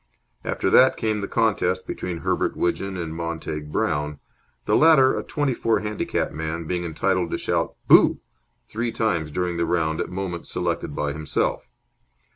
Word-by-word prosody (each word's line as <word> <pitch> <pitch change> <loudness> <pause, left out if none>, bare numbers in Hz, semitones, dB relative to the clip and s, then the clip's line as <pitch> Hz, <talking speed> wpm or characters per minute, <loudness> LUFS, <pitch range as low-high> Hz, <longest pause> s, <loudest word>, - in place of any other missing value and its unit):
After - - -1
that 130 +1 +6
came 110 -2 -1
the 100 - -3
contest 95 -5 +1
between 85 -2 -5
Herbert - - 0
Widgeon 95 +2 -1
and 85 -2 -4
Montague 80 -2 -4
Brown, 75 0 -1 0.5
the - - +2
latter, 150 -5 +6
a - - -2
twenty 145 -3 -1
four 115 -1 +1
handicap 105 0 -2
man, 80 +2 -4
being 90 +2 -2
entitled 85 +1 0
to - - -2
shout - - -1
"Boo!" - - +6 0.5
three 115 +2 -2
times 85 -10 0
during 90 +2 -2
the 85 - +1
round 80 -2 0
at - - -3
moments 90 -2 -5
selected 70 - -2
by 75 -1 -1
himself. 75 -4 -2
90 Hz, 160 wpm, -24 LUFS, 80-105 Hz, 0.5 s, that